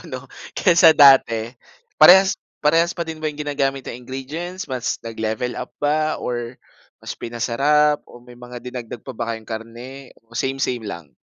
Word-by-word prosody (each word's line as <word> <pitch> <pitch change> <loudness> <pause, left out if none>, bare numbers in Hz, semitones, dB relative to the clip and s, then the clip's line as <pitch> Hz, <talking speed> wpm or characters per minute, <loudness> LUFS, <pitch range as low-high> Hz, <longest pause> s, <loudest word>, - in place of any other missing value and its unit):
'no? - - -5 0.4
Kaysa 175 -3 +6
dati, 130 -5 +5 0.4
parehas 190 +5 +7 0.2
parehas 165 +3 +3
pa 170 -1 -3
din 160 -1 -7
ba 155 - 0
'yong 150 0 -7
ginagamit 135 -2 -1
na - - -5
ingredients, 150 +9 -6
mas 130 -2 -3
nag-level 110 +2 -3
up 125 - -6
ba 155 +1 0
or 120 0 -5 0.4
mas - - -6
pinasarap 140 +6 +1
o 120 - -13
may 125 0 -15
mga 125 0 -9
dinagdag 120 -2 -7
pa 130 - -7
ba 115 -1 -3
kayong 110 -1 -8
karne, 120 +4 -8 0.2
o 115 - -19
same-same 130 -3 -2
lang? 85 -7 -8
130 Hz, 160 wpm, -21 LUFS, 120-150 Hz, 0.4 s, parehas